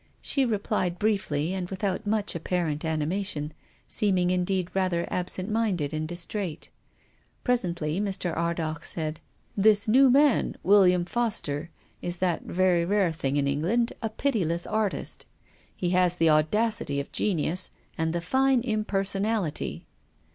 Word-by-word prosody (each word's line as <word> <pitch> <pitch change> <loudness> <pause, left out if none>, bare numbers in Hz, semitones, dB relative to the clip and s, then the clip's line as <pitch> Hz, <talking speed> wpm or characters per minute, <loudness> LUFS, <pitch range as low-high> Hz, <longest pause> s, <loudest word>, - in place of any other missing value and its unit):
She 275 -2 +1
replied 205 -5 -1
briefly 190 -7 0
and 185 -2 -3
without 195 +2 -2
much 210 -1 0
apparent 170 -2 -2
ani 160 -2 0
mation, 160 -4 -2 0.4
seeming 185 -4 +1
indeed 185 0 0
rather 185 -3 0
absent 185 +1 -1
minded 210 -10 0
and 155 0 -2
distraite. 175 -1 -4 0.7
Presently 175 - 0
Mr. 190 -4 -1
Ardagh 165 -2 -2
said, 155 -1 -3 0.2
" - - -38
This 210 -1 +5
new 260 +5 +6
man, 280 0 +4
William 180 -3 +5
Foster, 175 -9 -2 0.3
is 175 0 -3
that 175 -2 0
very 180 -1 +2
rare 195 -1 +2
thing 145 -3 -2
in 140 - +2
England 180 - +1
— - - -34
a 225 - -1
pitiless 195 - 0
artist. 215 -2 -2 0.5
He 175 -1 -1
has 180 -1 +3
the 165 -2 +4
audacity 155 0 +1
of 140 - -6
genius 185 -2 0 0.3
and 160 0 0
the 170 +1 -2
fine 265 +7 +2
impersonality." 205 -4 -1
185 Hz, 140 wpm, -27 LUFS, 165-210 Hz, 0.7 s, new